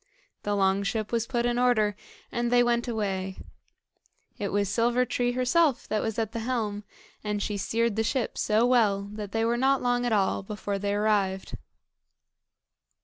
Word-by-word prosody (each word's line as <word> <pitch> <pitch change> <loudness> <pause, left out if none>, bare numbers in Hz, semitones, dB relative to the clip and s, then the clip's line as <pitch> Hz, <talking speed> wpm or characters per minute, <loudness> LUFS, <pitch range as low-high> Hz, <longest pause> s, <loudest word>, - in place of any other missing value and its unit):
The 205 0 -1
long 195 0 +2
ship 210 +1 -2
was 230 -1 0
put 240 -2 0
in 240 0 +1
order 215 -5 +3 0.4
and 240 0 -1
they 245 0 +5
went 240 0 +1
away. 195 -4 -2 1.0
It 205 - -1
was 205 0 +1
Silver 235 +5 +2
tree 245 0 0
herself 255 +3 +2
that 215 -1 0
was 225 -2 -3
at 220 -2 -1
the 230 - -4
helm, 220 -3 -2 0.4
and 210 -1 -2
she 205 +1 -2
steered 225 +3 0
the 220 - +1
ship 245 +2 -1
so 220 +2 +2
well 220 -6 +3
that 210 -2 -6
they 225 +1 0
were 235 +1 +1
not 265 +2 +3
long 245 0 +1
at - - -1
all 195 -3 +1
before 200 0 -4
they 200 0 -1
arrived. 205 -2 0
220 Hz, 175 wpm, -27 LUFS, 205-240 Hz, 1.0 s, they